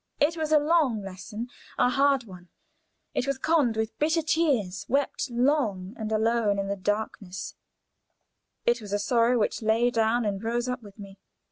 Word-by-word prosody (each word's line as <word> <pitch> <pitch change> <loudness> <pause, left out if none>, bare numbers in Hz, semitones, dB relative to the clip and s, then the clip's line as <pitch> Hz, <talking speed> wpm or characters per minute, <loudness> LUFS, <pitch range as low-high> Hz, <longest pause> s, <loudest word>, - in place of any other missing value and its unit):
It 305 +3 +3
was 315 -2 -2
a 310 - +7
long 295 -8 +2
lesson 200 +5 -7 0.3
a - - +4
hard 275 0 +3
one; 180 -5 -13 0.6
it 255 - -1
was 275 -1 0
conned 275 -6 +2
with 220 0 -2
bitter 320 +2 +2
tears, 280 - +1
wept 275 +1 0
long 240 -7 0
and 220 -1 -5
alone 220 -1 +2
in 195 0 -2
the 200 - 0
darkness; 200 -2 -3 1.1
it 235 0 +2
was 205 -1 -7
a - - +3
sorrow 235 +3 +2
which 220 - 0
lay 225 +2 +2
down 230 +1 +1
and 200 0 -2
rose 240 +2 -1
up 250 0 -3
with 205 -2 -14
me. 195 -2 -11
230 Hz, 170 wpm, -27 LUFS, 205-275 Hz, 1.1 s, a